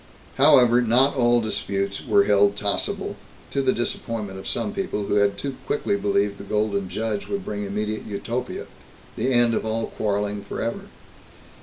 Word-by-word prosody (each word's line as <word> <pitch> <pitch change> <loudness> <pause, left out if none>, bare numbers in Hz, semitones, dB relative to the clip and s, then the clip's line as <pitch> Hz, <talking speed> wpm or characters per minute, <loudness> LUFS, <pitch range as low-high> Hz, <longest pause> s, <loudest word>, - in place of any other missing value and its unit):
However, 125 -4 +6
not 125 +4 +3
all 120 -2 +4
disputes 100 -2 -2
were 100 - +4
held 100 0 +4
tossable, 105 -1 -2 0.3
to 140 - 0
the 130 -1 +3
disappointment 110 -4 -3
of - - -8
some 210 - -2
people 190 - -2
who 105 - +1
had 100 -1 +2
too 140 -2 -4
quickly 125 - 0
believed 100 0 0
the - - -7
Golden 100 -2 -1
Judge 105 +2 -3
would 200 -1 -3
bring 105 -1 -3
immediate 105 +2 -3
Utopia, 115 +5 -4 0.5
the 125 +4 0
end 120 -2 +4
of - - 0
all 110 +1 -1
quarreling 105 -1 -1
forever. 115 +3 -4
110 Hz, 160 wpm, -24 LUFS, 100-120 Hz, 0.5 s, However